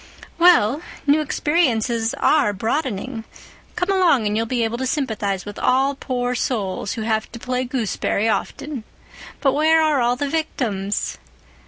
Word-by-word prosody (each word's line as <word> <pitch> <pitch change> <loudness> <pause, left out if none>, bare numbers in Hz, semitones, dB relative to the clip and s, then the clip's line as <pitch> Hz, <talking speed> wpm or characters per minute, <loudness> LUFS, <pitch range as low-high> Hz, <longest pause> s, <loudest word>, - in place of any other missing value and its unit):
"Well, 320 -6 +5 0.2
new 295 +2 +4
experiences 250 -6 +1
are 285 -7 +3
broadening. 225 +1 -2 0.5
Come 360 +2 0
along, 350 - +3
and 210 0 0
you'll 225 +1 0
be 240 0 0
able 225 +1 -2
to 260 - -1
sympathize 215 -9 -2
with 205 0 -7
all 265 +2 +2
poor 250 -2 -2
souls 205 -6 -2
who 225 -3 -4
have 220 -1 -1
to - - -6
play 250 +2 -2
gooseberry 225 -3 -1
often. 260 +3 -2 0.6
But 270 -2 +3
where 315 +3 +4
are 305 -4 +2
all 240 +1 +2
the 285 +3 -2
victims?" 235 -10 -2
250 Hz, 150 wpm, -21 LUFS, 220-290 Hz, 0.6 s, Well